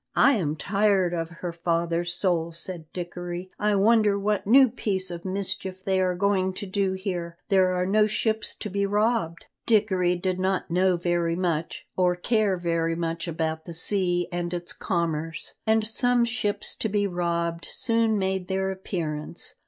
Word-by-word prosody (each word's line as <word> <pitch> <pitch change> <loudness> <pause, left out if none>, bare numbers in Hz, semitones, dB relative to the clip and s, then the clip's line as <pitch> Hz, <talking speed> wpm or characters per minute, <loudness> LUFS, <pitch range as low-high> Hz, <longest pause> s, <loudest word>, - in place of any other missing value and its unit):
"I 280 - +6
am 170 - 0
tired 195 0 +2
of 165 -1 -2
her 170 +1 -6
father's 170 0 0
soul," 175 -2 0
said 170 -1 -7
Dickory. 175 +1 -6
"I 210 0 +2
wonder 210 0 +4
what 205 0 -1
new 265 +4 +7
piece 190 -5 -2
of 170 0 -6
mischief 190 -1 -3
they 190 -1 +2
are 180 -1 +1
going 190 0 +1
to 200 - -5
do 195 0 0
here; 180 -3 -4
there 185 -2 +4
are 180 0 0
no 210 +3 +3
ships 220 +1 -1
to - - -6
be 200 +1 0
robbed?" 210 -5 0 0.2
Dickory 190 -5 +3
did 185 +1 -2
not 185 -2 -1
know 180 +1 +3
very 170 -1 0
much, 170 -3 -2
or 180 -1 +2
care 205 0 +1
very 165 -1 0
much 165 0 -3
about 160 -1 -2
the 170 - -6
sea 175 0 +1
and 175 0 -2
its 175 0 -5
commerce, 165 -4 -2
and 220 0 +3
some 245 +2 +3
ships 225 -3 -1
to 220 - -1
be 205 0 +1
robbed 170 -2 -1
soon 230 -2 +1
made 190 -1 -1
their 190 0 -1
appearance. 165 -5 -4
185 Hz, 170 wpm, -26 LUFS, 170-200 Hz, 0.2 s, new